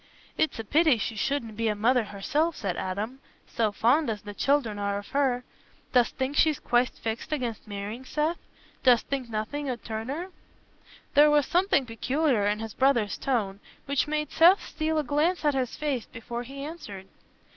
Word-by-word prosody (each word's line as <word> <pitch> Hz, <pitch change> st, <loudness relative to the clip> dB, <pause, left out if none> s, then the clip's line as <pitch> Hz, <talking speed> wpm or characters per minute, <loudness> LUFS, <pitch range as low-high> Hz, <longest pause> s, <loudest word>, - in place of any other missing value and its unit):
"It's 315 Hz, -, 0 dB
a 225 Hz, -, -4 dB
pity 300 Hz, +3 st, +4 dB
she 225 Hz, +1 st, -3 dB
shouldna 230 Hz, 0 st, -1 dB
be 225 Hz, +2 st, -1 dB
a 210 Hz, -, +1 dB
mother 235 Hz, +3 st, +2 dB
herself," 290 Hz, +12 st, -1 dB
said 190 Hz, -5 st, -3 dB
Adam, 205 Hz, +9 st, -4 dB, 0.3 s
"so 220 Hz, -2 st, 0 dB
fond 245 Hz, +8 st, +2 dB
as 215 Hz, -2 st, -3 dB
the 205 Hz, 0 st, -7 dB
children 240 Hz, -4 st, +1 dB
are 200 Hz, 0 st, -1 dB
of 205 Hz, -, -8 dB
her. 265 Hz, -3 st, +1 dB, 0.5 s
Dost 245 Hz, -3 st, +3 dB
think 265 Hz, +2 st, -2 dB
she's 310 Hz, -2 st, +4 dB
quite 245 Hz, +1 st, +2 dB
fixed 225 Hz, +5 st, -5 dB
against 245 Hz, -8 st, -3 dB
marrying, 205 Hz, +4 st, -5 dB
Seth? 305 Hz, +5 st, -1 dB, 0.4 s
Dost 245 Hz, -3 st, +5 dB
think 265 Hz, -4 st, -2 dB
nothing 235 Hz, +7 st, -3 dB
'ud 245 Hz, -2 st, -4 dB
turn 220 Hz, +1 st, -5 dB
her?" 340 Hz, +7 st, -4 dB, 0.8 s
There 295 Hz, +1 st, +7 dB
was 295 Hz, -2 st, +4 dB
something 360 Hz, -5 st, +2 dB
peculiar 250 Hz, -1 st, +1 dB
in 210 Hz, +1 st, 0 dB
his 225 Hz, -2 st, -6 dB
brother's 260 Hz, -6 st, +2 dB
tone, 210 Hz, -7 st, -1 dB, 0.3 s
which 280 Hz, 0 st, 0 dB
made 300 Hz, -1 st, -2 dB
Seth 355 Hz, +4 st, +5 dB
steal 315 Hz, 0 st, -1 dB
a 305 Hz, -, +2 dB
glance 300 Hz, +6 st, +1 dB
at 295 Hz, -, +4 dB
his 255 Hz, -3 st, -1 dB
face 280 Hz, -6 st, -2 dB
before 235 Hz, +1 st, -6 dB
he 275 Hz, +3 st, -8 dB
answered. 210 Hz, -, -8 dB
255 Hz, 180 wpm, -27 LUFS, 220-295 Hz, 0.8 s, There